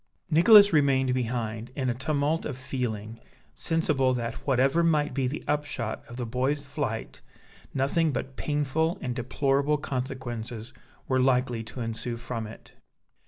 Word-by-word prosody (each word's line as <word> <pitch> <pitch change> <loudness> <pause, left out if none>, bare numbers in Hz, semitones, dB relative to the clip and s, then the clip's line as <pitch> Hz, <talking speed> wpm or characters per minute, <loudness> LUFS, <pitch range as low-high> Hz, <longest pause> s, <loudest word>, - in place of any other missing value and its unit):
Nicholas 200 +5 +8
remained 135 -3 +3
behind, 115 -2 -2
in 130 -2 -1
a 125 - +2
tumult 145 +4 0
of 140 -4 -4
feeling, 115 -4 -4 0.3
sensible 145 -6 +1
that 115 -1 -2
whatever 135 +4 +3
might 155 -4 +2
be 130 -1 0
the 145 +4 -4
upshot 145 -7 -2
of 120 - -8
the 125 - -2
boy's 130 +5 0
flight, 140 -6 -4 0.5
nothing 145 +4 +1
but 135 0 -4
painful 150 +3 0
and 125 -1 -3
deplorable 140 +3 +1
consequences 125 -4 -5 0.3
were 130 -1 +2
likely 125 -2 +2
to 120 +3 -8
ensue 115 +1 -3
from 115 -1 -5
it. 110 - -13
130 Hz, 140 wpm, -27 LUFS, 120-145 Hz, 0.5 s, Nicholas